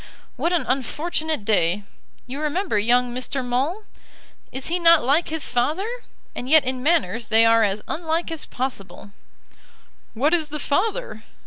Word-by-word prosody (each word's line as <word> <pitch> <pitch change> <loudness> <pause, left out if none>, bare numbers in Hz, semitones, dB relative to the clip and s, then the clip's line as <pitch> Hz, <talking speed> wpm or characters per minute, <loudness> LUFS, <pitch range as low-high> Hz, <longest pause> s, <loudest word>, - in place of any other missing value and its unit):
"What 340 - -1
an 350 -3 +1
unfortunate 300 +1 -2
day! 200 -2 +1 0.4
You 270 +4 -6
remember 310 - 0
young 245 +3 +2
Mr. 255 +1 -3
Maule? 275 - -1 0.7
Is 265 0 -6
he 350 +2 -1
not 335 -3 +6
like 285 +7 +2
his 320 -1 -1
father? 295 +11 0 0.5
And 250 - -6
yet 310 -1 +6
in 255 0 -2
manners 275 -7 +1
they 225 0 +5
are 230 0 +5
as 205 -1 0
unlike 330 +1 -2
as 325 - -5
possible." 200 -7 -6 1.0
"What 285 +8 +2
is 325 -3 +2
the 300 0 -5
father?" 420 - -2
275 Hz, 150 wpm, -22 LUFS, 240-325 Hz, 1.0 s, not